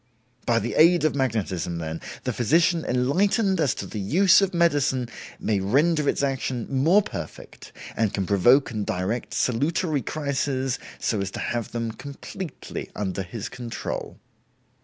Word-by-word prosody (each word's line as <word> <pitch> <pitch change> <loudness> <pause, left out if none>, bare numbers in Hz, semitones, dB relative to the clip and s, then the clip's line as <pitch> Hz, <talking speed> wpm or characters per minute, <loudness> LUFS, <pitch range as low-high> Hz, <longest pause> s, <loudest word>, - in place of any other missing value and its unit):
By 120 -2 +3
the 115 +1 -1
aid 170 +2 +6
of 155 - +2
magnetism, 105 - -1
then, 80 0 -5 0.2
the 125 - -1
physician 165 +8 +2
enlightened 190 - +2
as 145 -6 +2
to - - -5
the 110 - -6
use 185 - +5
of 195 -1 +1
medicine 145 -8 +2 0.3
may 105 -2 0
render 145 - +2
its - - 0
action 135 -3 -1
more 165 +10 +4
perfect, - - -8 0.2
and 110 -3 +1
can 95 - -2
provoke 120 +9 +4
and 110 -2 -2
direct 95 +6 -2
salutary 145 +4 +1
crises 135 -2 -1 0.2
so 105 -3 -1
as 100 - -2
to - - -7
have 120 -3 -3
them 115 -1 -2
completely 140 - -7
under 100 -1 -2
his 95 +3 -6
control." 120 -2 -5
130 Hz, 150 wpm, -25 LUFS, 110-155 Hz, 0.3 s, aid